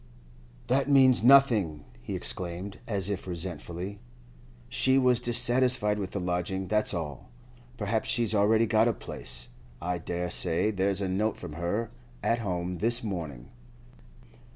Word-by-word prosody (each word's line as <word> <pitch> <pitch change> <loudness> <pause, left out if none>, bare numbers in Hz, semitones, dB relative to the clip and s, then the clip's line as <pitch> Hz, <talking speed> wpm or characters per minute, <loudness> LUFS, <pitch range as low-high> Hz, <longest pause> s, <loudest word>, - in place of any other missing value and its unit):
'That 135 +3 0
means 130 -3 +5
nothing!' 115 - +4 0.2
he - - -5
exclaimed, 85 +10 -4
as 100 -4 0
if 100 -2 -4
resentfully. 90 +2 -5 0.7
'She 130 - +2
was 125 -2 +3
dissatisfied 120 -3 +4
with 95 -2 -4
the 100 - -4
lodging, 90 +1 -2
that's 105 +1 +2
all. 75 -7 -6 0.5
Perhaps 110 +1 -2
she's 115 -3 +1
already 110 +2 +3
got 110 +1 +3
a 120 - +1
place. - - -2 0.3
I 90 +1 -3
dare 85 +1 -4
say 85 +6 +1
there's 100 0 0
a 95 - -1
note 105 +4 -1
from 75 - -8
her 95 +8 -3 0.3
at 115 - +1
home 90 -4 -3
this 115 +3 +2
morning. 80 - -6
100 Hz, 140 wpm, -28 LUFS, 90-115 Hz, 0.7 s, means